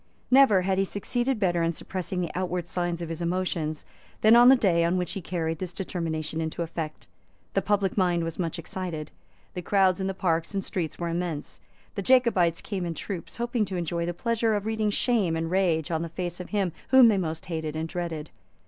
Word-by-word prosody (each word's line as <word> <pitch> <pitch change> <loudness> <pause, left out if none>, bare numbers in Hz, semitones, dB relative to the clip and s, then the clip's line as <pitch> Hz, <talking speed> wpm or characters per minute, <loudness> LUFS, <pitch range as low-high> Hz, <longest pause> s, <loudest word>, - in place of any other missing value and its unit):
Never 250 -8 +6
had 190 0 +1
he - - +4
succeeded 240 +6 -1
better 175 -4 +2
in 165 0 +1
suppressing 185 +2 -4
the 170 - -2
outward 180 -1 -2
signs 175 -1 -2
of 165 - -6
his 165 +1 -5
emotions 170 -3 -2 0.4
than 220 +2 +7
on 240 +1 +8
the 265 - +9
day 180 -8 +3
on 170 +2 +2
which 180 -1 -2
he 195 - -4
carried 165 -2 -2
this 180 -2 -4
determination 165 -4 -3
into 160 +1 -2
effect. 160 -2 -5 0.5
The - - +2
public 200 -2 +1
mind 175 -3 +2
was 165 +1 -5
much 170 -1 -2
excited. 170 -3 -5 0.4
The 180 - -4
crowds 190 +1 +2
in 190 - -1
the 195 - -3
parks 170 0 0
and 195 - -1
streets 170 -4 -3
were 170 -1 -3
immense. 170 -3 -3 0.3
The 200 - -3
Jacobites 195 -8 +3
came 195 -3 -4
in 170 -1 -3
troops, 185 -1 -6
hoping 240 -1 0
to 190 -1 -5
enjoy 170 0 -2
the 175 - -1
pleasure 230 +1 +1
of 205 0 -2
reading 220 -1 0
shame 205 -6 +1
and 165 +1 -2
rage 175 -4 +1
on 160 -1 0
the 170 - -4
face 175 +1 -4
of 180 - -7
him 200 -4 0 0.2
whom 260 -2 +8
they 215 -3 +4
most 160 -3 -3
hated 160 -3 -4
and 160 +1 -2
dreaded. 165 -3 -4
180 Hz, 210 wpm, -27 LUFS, 165-195 Hz, 0.5 s, the